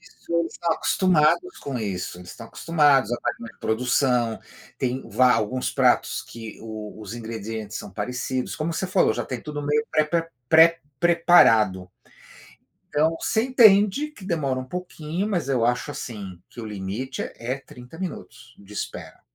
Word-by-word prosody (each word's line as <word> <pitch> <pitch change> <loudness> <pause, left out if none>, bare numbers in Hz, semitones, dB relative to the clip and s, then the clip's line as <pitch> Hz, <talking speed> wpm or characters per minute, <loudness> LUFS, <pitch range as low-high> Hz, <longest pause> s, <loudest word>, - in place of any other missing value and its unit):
isso, - - -12
eles 170 -1 -1
estão 170 - -2
acostumados 185 - +2
com 135 -3 -4
isso. 95 -4 -4
Eles 90 -1 -10
estão 115 - -10
acostumados 145 -8 +3
a - - +1
estar - - -2
com - - -14
uma 115 - -11
produção, 125 0 +1 0.4
tem 130 +1 -2
va 125 -1 +4
alguns 125 +3 0
pratos - - +2
que 115 -2 -10
o 110 -1 -7 0.2
os 105 -1 -7
ingredientes 110 -2 -6
são 105 - -8
parecidos, 125 +5 -3
como 160 +2 -2
você 175 +3 -2
falou, 185 0 +3
já - - -3
tem 125 -2 -5
tudo 150 -1 -5
meio 150 +1 +1
prepa 160 +2 +1 0.2
pré-preparado. 160 - +4 1.0
Então, 155 +2 +2
você 220 - +1
entende 235 +2 +5
que 205 -10 -14
demora 145 -8 -1
um 130 - -4
pouquinho, 175 +3 -4
mas 175 -10 -1
eu 125 -4 +2
acho, 125 +4 0
assim, 100 -10 -7
que - - -10
o - - -6
limite 105 +6 -5
é - - -7
é 125 +3 -3
30 125 +2 -13
minutos 185 -4 -7
de 100 +1 -15
espera. 105 - -6
130 Hz, 165 wpm, -24 LUFS, 115-165 Hz, 1.0 s, entende